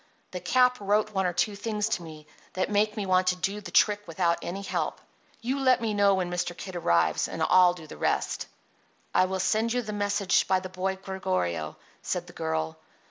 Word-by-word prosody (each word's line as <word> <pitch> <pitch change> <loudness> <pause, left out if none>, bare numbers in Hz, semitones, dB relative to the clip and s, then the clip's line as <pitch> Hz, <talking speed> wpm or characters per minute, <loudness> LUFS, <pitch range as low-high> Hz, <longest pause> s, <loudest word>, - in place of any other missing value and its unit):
The - - -4
Cap 250 0 +3
wrote 210 +1 +1
one 190 -2 +1
or 175 - -1
two 205 +4 0
things 210 0 -2
to 220 - -1
me 155 -2 -10 0.3
that 185 +2 -1
make 210 +1 +1
me 205 - -2
want 185 -1 +2
to 185 - +3
do 195 +3 -2
the 205 - -8
trick 205 -1 +3
without 170 0 +1
any 195 +3 -5
help. - - -2 0.4
You 260 +4 -1
let 260 -1 +4
me 225 -2 -1
know 200 -1 +4
when 180 -2 -2
Mr. 175 0 -2
Kid 190 -2 -7
arrives, 85 - +2
and - - -3
I'll 180 -1 +5
do 165 -3 -11
the 155 - -11
rest." - - -1 0.7
"I 185 - +4
will 190 0 -3
send 220 +4 +1
you 245 0 0
the 215 -1 -5
message 205 -2 +1
by 190 - +3
the 185 0 -7
boy 185 +1 -2
Gregorio," 90 - -3 0.2
said - - -2
the - - -14
girl. 80 0 -3
190 Hz, 210 wpm, -27 LUFS, 175-210 Hz, 0.7 s, I'll